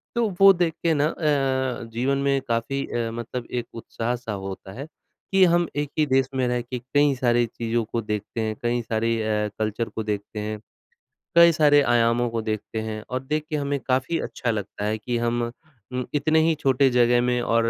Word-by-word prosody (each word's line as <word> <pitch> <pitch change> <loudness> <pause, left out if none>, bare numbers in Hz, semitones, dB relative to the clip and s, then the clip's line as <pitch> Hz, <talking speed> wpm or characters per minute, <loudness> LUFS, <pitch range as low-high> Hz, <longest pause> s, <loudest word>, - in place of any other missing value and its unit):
तो 235 -2 +2
वो 195 0 +9
देख 170 -2 0
के 165 - +3
ना 145 -1 +2
अ, 135 -6 0
जीवन 130 +4 0
में 140 0 +1
काफ़ी 120 +4 -1
अ, 115 -1 -2
मतलब 120 +1 -5
एक 120 -1 -2
उत्साह-सा 115 +1 -4 0.2
होता 95 0 -8
है 140 +5 -7 0.4
कि 195 0 +5
हम 175 -1 +3
एक 145 -1 -1
ही 155 - +4
देश 135 -1 +2
में 130 -1 +1
रह 125 0 0
के 125 +1 -6
कई 145 +3 +2
सारी 120 -2 +2
चीज़ों 115 0 -2
को 115 +1 -3
देखते 105 +1 -4
हैं, 110 -1 -2
कई 120 0 0
सारे 115 0 0
अ, 105 -1 0
कल्चर 110 +1 -1
को 110 - -4
देखते 105 0 -4
हैं, 105 0 -4 0.8
कई 170 0 +8
सारे 150 -2 +5
आयामों 120 -1 +2
को 115 -1 -2
देखते 110 0 -3
हैं, 110 -1 -5
और 130 +1 -3
देख 150 +3 -2
के 155 - -2
हमें 140 -1 -1
काफ़ी 130 +5 +1
अच्छा 120 - -2
लगता 105 -1 -4
है 110 +1 0
कि 120 +2 -3
हम 120 0 0 0.5
उम, 125 -1 -2
इतने 155 +2 +3
ही 165 - +3
छोटे 135 -2 +3
जगह 120 0 +4
में 125 0 +1
और 115 0 +2
120 Hz, 200 wpm, -24 LUFS, 115-140 Hz, 0.8 s, वो